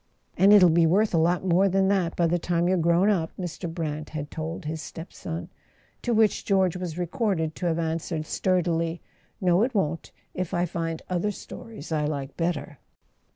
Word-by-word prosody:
" - - -44
And 195 +3 +5
it'll 185 -5 +8
be 165 0 +4
worth 200 +6 +2
a 165 - +4
lot 175 +3 +2
more 185 +2 +4
than 190 +1 +2
that 185 -4 +1
by 170 - +2
the 175 +1 +1
time 175 0 0
you're 185 - +3
grown 170 +2 +3
up," 175 -6 +2
Mr. 175 -1 -4
Brant 155 -2 -4
had 145 -1 -5
told 160 +2 -5
his 155 +1 -3
step 165 +2 -9
son; 165 0 -6 0.5
to 245 - -1
which 220 -2 +3
George 190 -3 +2
was 180 -3 -5
recorded 175 -2 -1
to 180 - -1
have 165 -1 +1
answered 165 -1 -2
stur¬ 185 +3 +1
dily: 165 0 -1 0.4
"No, 180 0 +3
it 245 +1 0
won't, 165 -4 -1 0.2
if 185 -2 -3
I 175 +1 +2
find 165 -1 -4
other 180 +3 0
stories 210 -3 -9
I 150 -2 +1
like 140 -2 -4
better." 165 -4 -2
170 Hz, 200 wpm, -26 LUFS, 160-185 Hz, 0.5 s, it'll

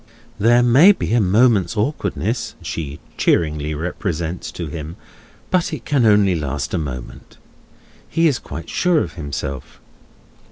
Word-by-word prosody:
There 120 +3 +4
may 140 +12 +7
be 150 - -3
a 120 - +4
moment's 105 +1 +3
awkwardness, 105 - -2
she 75 -3 -5 0.2
cheeringly 75 -2 +1
represents 85 +1 -3
to 85 - -5
him, 80 +2 -7 0.6
but 180 -1 +1
it 145 -7 -6
can 135 -6 +2
only 105 -3 +4
last 70 -2 -3
a 90 - +1
moment. 65 -5 -7 0.7
He 165 0 +3
is 140 -5 +1
quite 85 - -8
sure 175 -4 +2
of 85 - -8
himself. 70 -4 -6
90 Hz, 135 wpm, -20 LUFS, 75-120 Hz, 0.7 s, may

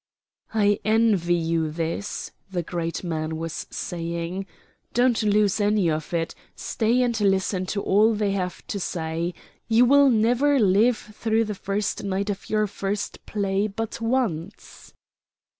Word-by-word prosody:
"I 205 -1 +3
envy 215 -5 +3
you 165 -1 0
this," 165 +5 -4 0.2
the 180 -3 -2
great 165 +1 -3
man 160 -2 -2
was 165 0 -5
saying. 170 +2 -4 0.5
"Don't 245 -1 +3
lose 210 -1 +2
any 205 -4 +2
of 155 0 -3
it, 165 -1 -1 0.2
stay 235 +3 +1
and 235 -3 0
listen 190 -1 +1
to 200 +1 -2
all 215 +3 +4
they 205 -1 0
have 180 -3 -3
to 200 - -4
say. 170 -1 -3 0.3
You 230 +2 +5
will 280 +2 +6
never 245 +5 +3
live 215 +3 +4
through 220 +1 -1
the 210 - -3
first 200 +2 -2
night 200 +1 -1
of 195 - -7
your 215 0 +2
first 200 0 -4
play 200 0 0
but 225 +2 -5
once." 225 -9 -3
200 Hz, 140 wpm, -24 LUFS, 175-220 Hz, 0.5 s, will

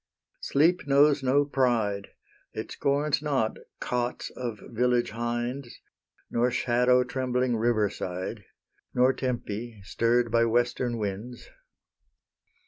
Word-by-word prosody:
Sleep 160 +3 +2
knows 140 +1 +5
no 135 +2 +3
pride; 115 -8 0 0.5
It - - -6
scorns 145 +1 0
not 135 -7 0 0.2
cots 125 0 -2
of 120 -4 -5
village 120 0 +1
hinds, 120 +3 -4 0.5
Nor 120 +1 +2
shadow 125 +1 +3
trembling 125 -1 -1
river 110 -2 +2
side, 95 +3 -5 0.5
Nor 125 +1 +4
Tempe, 120 -3 -4
stirr'd 115 +3 +1
by 115 0 +4
western 120 +1 0
winds. 105 +4 -5
120 Hz, 105 wpm, -27 LUFS, 115-130 Hz, 0.5 s, knows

